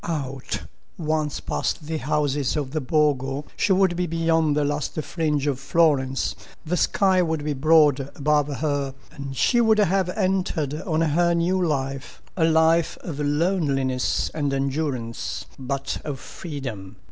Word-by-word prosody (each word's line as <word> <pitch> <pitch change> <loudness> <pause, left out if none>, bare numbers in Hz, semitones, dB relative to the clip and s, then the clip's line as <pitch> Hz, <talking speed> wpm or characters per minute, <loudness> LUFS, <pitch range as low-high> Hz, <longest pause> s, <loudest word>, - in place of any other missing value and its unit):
Out! 135 -5 -4 0.3
Once 155 -2 -1
past 155 - -2
the 160 +1 -2
houses 145 -1 0
of 140 -3 -2
the 155 +1 -1
Borgo, 140 -1 +1
she - - +1
would 190 -2 +3
be 180 0 -1
beyond 165 -2 +1
the 150 - +2
last 145 0 -2
fringe 150 -4 -1
of 140 -3 0
Florence, 135 -3 +1 0.3
the 170 +3 0
sky 190 0 +3
would 160 -3 -1
be 150 - 0
broad 145 -1 +4
above 150 0 +2
her, 145 -3 -1 0.2
and 140 -2 -7
she 240 -2 +3
would 220 -2 +4
have 195 -2 +2
entered 180 -6 0
on 160 -4 0
her 170 +2 +2
new 180 +2 +1
life—a 135 +2 -2
life 160 +1 +3
of 150 -5 -6
loneliness 145 -4 0
and 145 -3 -1
endurance, 135 -4 -2
but 135 +1 -3
of 140 -3 -4
freedom. 130 - -7
150 Hz, 145 wpm, -24 LUFS, 140-165 Hz, 0.3 s, broad